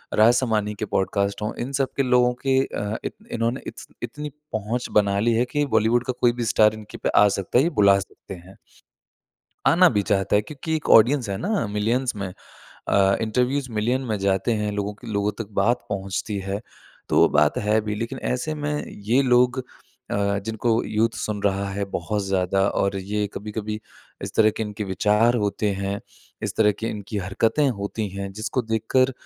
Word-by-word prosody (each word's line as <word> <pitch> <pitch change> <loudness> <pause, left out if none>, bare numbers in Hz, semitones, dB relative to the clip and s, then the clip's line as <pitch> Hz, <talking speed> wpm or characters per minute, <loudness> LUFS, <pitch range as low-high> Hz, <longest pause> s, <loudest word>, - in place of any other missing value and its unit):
राज 110 +3 +6
शामानी 110 -4 0
के 110 - -1
पॉडकास्ट 100 +1 -1
हो। 105 - -2
इन 125 +3 -3
सब 135 -1 +1
के 140 - +3
लोगों 125 -1 +3
के 135 0 +4
अ, 105 +1 -3
इत - - -3 0.2
इन्होंने 115 +3 -1
इतस - - -8 0.2
इतनी 145 +5 -5 0.2
पहुँच 110 +3 -2
बना 100 -1 +3
ली 115 +2 +2
है 120 +2 +2
कि 145 -1 +1
बॉलीवुड 115 +2 +3
का 130 - -1
कोई 120 - +5
भी 120 -1 -3
स्टार 110 0 +4
इनके 110 -1 -10
पे - - -1
आ 105 - +6
सकता 100 +5 0
है, 135 - +5
ये 170 - +2
बुला 100 - +5
सकते 95 - -10
हैं। 90 +2 -12 1.1
आना 180 +1 +6
भी 105 - +2
चाहता 95 +1 +1
है 105 - +2
क्योंकि 155 +5 -5
एक 155 - -6
ऑडियंस 120 +1 +6
है 100 - -2
ना 200 - -1
मिलियंस 115 +4 0
में 100 -1 -3 0.6
अ, 100 0 +4
इंटरव्यूज 125 +4 0
मिलियन 115 +4 0
में 105 -2 -1
जाते 95 +4 +1
हैं। 105 -1 -1
लोगों 105 0 -2
के 115 +3 -12
लोगों 100 +1 0
तक 110 -3 -5
बात 120 +4 +1
पहुँचती 100 +1 -3
है 100 +2 -2 0.5
तो - - +2
वो - - +6
बात 75 +10 +3
है 110 0 +2
भी। 105 0 -3
लेकिन 115 +5 -4
ऐसे 155 +5 -2
में 150 0 -2
ये 115 +7 +1
लोग 125 0 +3 0.5
अ, 100 0 0
जिनको 115 +1 +1
यूथ 110 +2 +1
सुन 105 -1 -3
रहा 100 0 0
है 100 +1 -2
बहुत 105 +4 -2
ज़्यादा 95 0 +1
और 100 0 0
ये 105 +2 -2
कभी-कभी 105 +1 -5 0.4
इस - - -6
तरह 110 -1 +5
के - - -1
इनके 105 0 -4
विचार 105 +5 +2
होते 105 0 0
हैं। 100 +1 -3 0.4
इस - - -3
तरह 105 -1 +4
की 115 - -2
इनकी 105 0 -5
हरकतें 115 +9 +1
होती 105 +1 -3
हैं। 100 0 -5
जिसको 110 +4 -2
देखकर 115 +4 +1
110 Hz, 195 wpm, -23 LUFS, 100-120 Hz, 1.1 s, राज